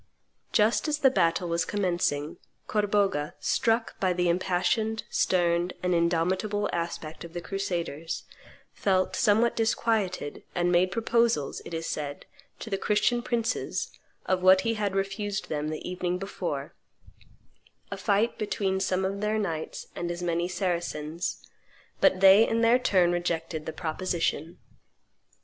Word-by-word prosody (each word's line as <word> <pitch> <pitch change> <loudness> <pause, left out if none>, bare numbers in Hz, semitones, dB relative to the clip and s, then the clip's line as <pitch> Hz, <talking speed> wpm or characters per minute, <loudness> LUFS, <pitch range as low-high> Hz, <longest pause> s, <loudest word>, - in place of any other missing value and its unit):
Just 220 +7 +3
as 300 -1 +1
the 270 -3 +4
battle 170 -5 +1
was 170 0 +1
commencing, 175 -6 -1 0.3
Corbogha, 200 -7 0
struck 225 0 0
by 185 -2 +2
the 180 0 +1
impassioned, 185 +5 0
stern, 175 -1 +1
and 180 0 +1
indomitable 180 +5 +1
aspect 170 -2 -4
of 170 -1 -10
the 175 - -3
crusaders, 175 -4 -3 0.5
felt 185 -2 +1
somewhat 225 +2 +3
disquieted, 220 -8 0
and 175 0 +1
made 180 +1 +4
proposals, 230 -9 +1
it - - -8
is 165 0 -3
said, 145 -3 -4 0.3
to 225 - -8
the 195 - 0
Christian 240 +4 +2
princes 235 -1 -2 0.3
of 185 -1 +1
what 185 +1 +6
he 230 - 0
had 205 -3 -2
refused 195 +1 -2
them 150 -1 -2
the 155 0 -5
evening 180 0 -2
before 195 +2 -4 1.2
a - - -2
fight 210 +2 +1
between 195 -2 -1
some 190 0 0
of 195 +1 -3
their 210 +1 0
knights 165 -7 -3
and 175 - -3
as 175 +1 -4
many 170 0 0
Saracens; 175 -2 -3 0.5
but 185 - +4
they 195 +3 +8
in 230 0 +1
their 235 +2 +5
turn 185 -8 +3
rejected 165 -2 -2
the - - -2
proposition. 165 0 -2
185 Hz, 140 wpm, -27 LUFS, 170-210 Hz, 1.2 s, they